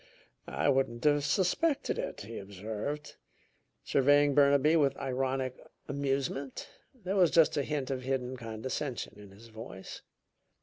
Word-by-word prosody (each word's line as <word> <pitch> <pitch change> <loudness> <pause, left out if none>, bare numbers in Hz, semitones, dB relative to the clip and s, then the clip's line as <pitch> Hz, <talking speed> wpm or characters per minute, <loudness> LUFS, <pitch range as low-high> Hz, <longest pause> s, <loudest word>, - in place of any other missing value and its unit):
"I - - -1
wouldn't 130 -4 +1
have 145 -1 +4
suspected 215 - +1
it," - - -4
he 110 +3 -7
observed, 105 +9 -5 0.7
surveying 145 +1 +4
Burnaby 140 +2 +5
with 140 -4 +3
ironic 130 -1 -2 0.3
amusement. 140 -1 -2 0.3
There 195 -5 -4
was 180 -4 +5
just 165 -1 +4
a 145 - +2
hint 140 -2 -2
of 130 -1 -2
hidden 130 -1 -2
condescension 115 0 -4
in 100 -1 -12
his 105 +4 -15
voice. 110 -4 -9
135 Hz, 130 wpm, -31 LUFS, 120-145 Hz, 0.7 s, Burnaby